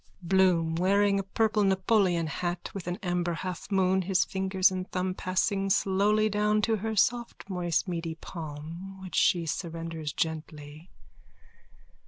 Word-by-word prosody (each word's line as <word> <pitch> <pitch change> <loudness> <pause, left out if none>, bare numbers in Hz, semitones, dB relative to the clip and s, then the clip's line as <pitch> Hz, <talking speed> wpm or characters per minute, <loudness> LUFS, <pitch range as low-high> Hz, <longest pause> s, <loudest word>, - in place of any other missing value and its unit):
BLOOM: 170 -3 +2
_(Wearing 200 +2 +3
a - - -2
purple 215 +2 +1
Napoleon 190 -3 +2
hat 175 +3 -3
with 190 -3 -7
an 175 0 -2
amber 175 -1 -1
halfmoon, 185 +1 0
his 190 0 +2
fingers 190 0 +2
and 185 0 -4
thumb 185 0 -1
passing 195 +2 0
slowly 205 +3 +2
down 210 0 +1
to 225 0 +2
her 220 +2 -3
soft 235 +3 0
moist 180 -3 -1
meaty 165 -2 -3
palm 165 +4 -8
which 185 -3 -9
she 170 -2 +3
surrenders 165 -1 -4
gently.) 155 0 -5
185 Hz, 135 wpm, -28 LUFS, 170-195 Hz, -, Wearing